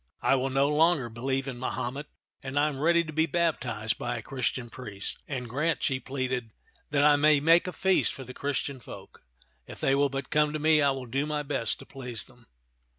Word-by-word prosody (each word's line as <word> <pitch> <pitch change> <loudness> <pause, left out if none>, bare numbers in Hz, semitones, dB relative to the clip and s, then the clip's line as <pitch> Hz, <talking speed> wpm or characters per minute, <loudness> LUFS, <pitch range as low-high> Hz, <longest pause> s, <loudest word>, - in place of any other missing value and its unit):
I - - +4
will 135 0 +1
no 135 +1 +2
longer 150 -3 +3
be 115 +1 -11
lieve 135 +1 0
in 125 -3 -5
Mahomet, 130 +3 -3 0.3
and 135 +1 -5
I 150 +1 +4
am 135 -3 -6
ready 170 +3 +4
to 155 -1 -8
be 160 +2 +2
baptized 125 -10 0
by 120 - -2
a 115 - -7
Christian 125 -2 -3
priest. 105 -6 -5
And 125 -4 -4
grant," 150 +8 -1
she 130 -2 +1
pleaded, 130 -2 -3 0.2
'* - - -34
that 145 0 +3
I 145 -1 +6
may 150 0 +5
make 165 +5 +5
a - - -2
feast 190 +1 +2
for 135 - -8
the 130 0 -9
Christian 140 -1 -3
folk. - - -12 0.5
If - - -10
they 135 - +2
will 140 +1 +3
but 135 +1 -5
come 150 0 +3
to - - -1
me, 155 0 +4
I 140 - +4
will 135 -1 -3
do 135 +5 -1
my 150 -1 -1
best 115 -7 -1
to - - -12
please 125 -5 -6
them." 120 -1 -21
135 Hz, 225 wpm, -28 LUFS, 125-150 Hz, 0.5 s, I